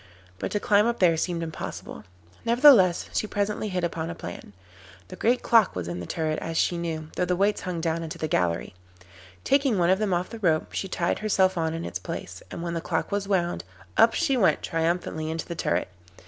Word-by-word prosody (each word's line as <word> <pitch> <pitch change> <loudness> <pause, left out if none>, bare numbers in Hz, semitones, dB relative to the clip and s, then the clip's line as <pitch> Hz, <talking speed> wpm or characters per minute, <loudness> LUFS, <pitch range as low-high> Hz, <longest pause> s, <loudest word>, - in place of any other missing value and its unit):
But - - -2
to 210 - +1
climb 205 +1 +3
up 235 0 0
there 175 -3 +4
seemed 170 +1 -2
impossible. 155 - -7 0.4
Nevertheless 235 -7 +6
she 215 - 0
presently 210 +1 -2
hit 180 -2 -2
upon 165 -1 -2
a 170 - -5
plan. 100 - -9 0.6
The - - -8
great 245 +2 +1
clock 225 -4 +4
was 90 -2 -4
in 85 0 -4
the 90 - -6
turret, 155 -2 -1
as 165 0 -4
she 175 - +2
knew, 160 -2 -4
though 180 - +1
the 180 0 0
weights 200 +3 +1
hung 180 -3 -3
down 165 0 -1
into 160 -2 -6
the 155 - -2
gallery. 90 - 0 0.7
Taking 275 -5 +2
one 175 0 +3
of 190 - +3
them 215 -2 0
off 180 +1 -1
the 230 - -7
rope, 160 -6 +1
she 195 - -2
tied 175 -2 -1
herself 190 -3 +2
on 160 -1 -1
in 165 - -4
its 85 - -4
place, 90 0 -7
and 170 - -6
when 170 -1 -3
the 165 - -2
clock 160 -1 -2
was 200 -1 -1
wound, 175 - 0 0.3
up 230 - +5
she 310 -5 +1
went 225 -7 +2
triumphantly 165 -1 -1
into 160 0 -3
the 170 - -5
turret. 90 - -1
175 Hz, 215 wpm, -26 LUFS, 160-205 Hz, 0.7 s, Nevertheless